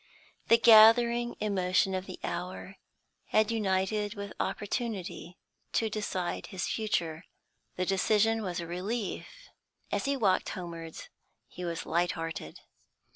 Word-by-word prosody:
The 230 - +7
gathering 235 +1 +6
emotion 190 -2 +1
of 185 0 -3
the 185 - -8
hour 185 +2 -5 0.5
had 215 +1 +2
united 205 0 0
with 200 0 -6
opportunity 195 -6 -3 0.4
to 225 -2 +1
decide 190 -4 -3
his 190 -1 -4
future. 170 -7 -1 0.5
The 185 - -1
decision 215 +4 +2
was 180 -4 -3
a 170 - -4
relief; 190 +5 -3 0.6
as - - -1
he 280 0 +1
walked 195 -6 +2
homewards, 165 -2 -7 0.4
he 180 - -9
was 170 -1 -4
lighthearted. 165 - -2
195 Hz, 120 wpm, -30 LUFS, 180-220 Hz, 0.6 s, The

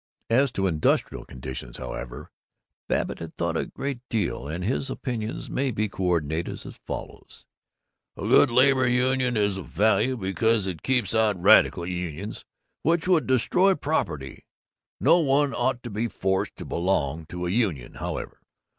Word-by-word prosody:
As 135 +3 +4
to 95 - 0
industrial 80 -5 +1
conditions, 65 -1 -7
however, 65 -1 -7 0.6
Babbitt - - -1
had 85 -1 -8
thought 85 -1 -1
a - - -1
great 140 -2 -4
deal, 105 - -1
and 85 +4 -4
his 130 +4 -1
opinions 115 -4 -4
may 135 0 -1
be 110 -2 0
coordinated 85 -4 -1
as - - -10
follows: - - -7 0.7
"A - - -8
good 145 - +5
labor 130 +1 +4
union 125 0 +2
is 100 -2 +1
of 95 - -8
value 110 +6 +2
because 110 +2 +1
it 90 -4 -4
keeps 130 -3 +1
out 110 -4 +2
radical 95 -2 +5
unions, 90 +2 -5 0.4
which 170 +2 +1
would 175 -4 +3
destroy 180 - +3
property. 85 - -3 0.5
No 175 - +5
one 145 -2 +2
ought 125 -2 0
to 120 - -6
be 110 +4 -1
forced 95 -2 -1
to - - -8
belong 80 -3 -1
to 90 +1 -5
a 90 - -1
union, 95 - 0
however. - - -5
105 Hz, 155 wpm, -25 LUFS, 85-130 Hz, 0.7 s, good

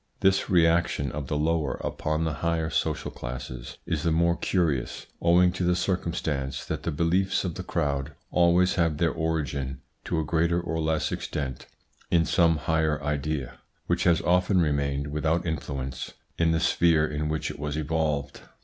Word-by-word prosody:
This 95 0 +3
reaction 85 -4 +3
of 70 -2 -5
the 75 - -1
lower 80 -2 0
upon 75 +1 -1
the 80 -2 -1
higher 85 -1 0
social - - -1
classes 60 0 -7
is 80 -3 -1
the 85 - +1
more 85 +1 +3
curious, 80 -11 -1 0.2
owing 90 +1 +5
to 90 - -3
the 90 0 +3
circumstance 80 -7 -2
that - - -3
the - - -2
beliefs 85 +5 +1
of 90 -3 -2
the - - -5
crowd 75 -5 -2 0.2
always 90 +1 +4
have 80 -3 +1
their 85 0 +2
origin 70 -5 -2 0.3
to 85 - -1
a 80 - -1
greater 85 +2 +2
or 80 -1 -3
less 80 -1 0
extent 70 -4 -4 0.4
in 85 -1 +3
some 85 -1 +3
higher 80 -1 +1
idea, 75 -2 -2 0.3
which - - 0
has 85 -2 +4
often 90 +2 +3
remained 70 -3 0
without 80 +3 0
influence 70 -5 -4 0.2
in 85 -1 +2
the 80 0 +2
sphere 80 -2 +3
in 75 0 -2
which 80 0 -2
it - - -11
was 75 0 -3
evolved. 75 -2 -1
80 Hz, 165 wpm, -27 LUFS, 75-85 Hz, 0.4 s, owing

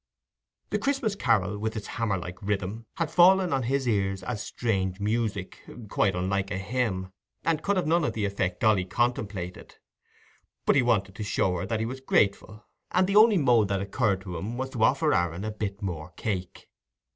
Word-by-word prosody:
The - - +1
Christmas 270 -6 0
carol, 105 - +1
with 110 +1 -2
its 105 - -5
hammer 110 -4 -1
like 90 0 -8
rhythm, 105 +2 -3
had 165 -2 -2
fallen 185 -1 +5
on 135 - +1
his 135 +2 0
ears 95 -3 0
as 110 -4 -3
strange 95 -6 -2
music, 105 -2 -2 0.3
quite 95 -2 +2
unlike 95 +2 -1
a 100 - -2
hymn, 95 -3 -2 0.3
and 160 -1 +1
could 200 +5 +1
have 180 - +1
none 165 +2 +2
of - - 0
the 105 -2 -1
effect 95 -3 -2
Dolly 110 -5 +4
contemplated. 100 -4 -2 0.9
But - - +4
he 135 - +5
wanted 105 -6 +1
to 105 - -6
show 95 -2 0
her 90 +2 -3
that 110 +1 -1
he - - 0
was 130 +3 -5
grateful, 105 -2 0 0.2
and 185 +1 +3
the 195 +2 -1
only 215 -1 +7
mode 120 - +4
that 100 -1 0
occurred 100 0 0
to 90 -3 -6
him 110 +8 -5
was 130 +1 -3
to 115 -4 -1
offer 145 +5 +3
Aaron 90 +2 0
a 110 - -2
bit 105 -1 -5
more 85 -3 -4
cake. 95 -5 -4
105 Hz, 190 wpm, -27 LUFS, 95-125 Hz, 0.9 s, only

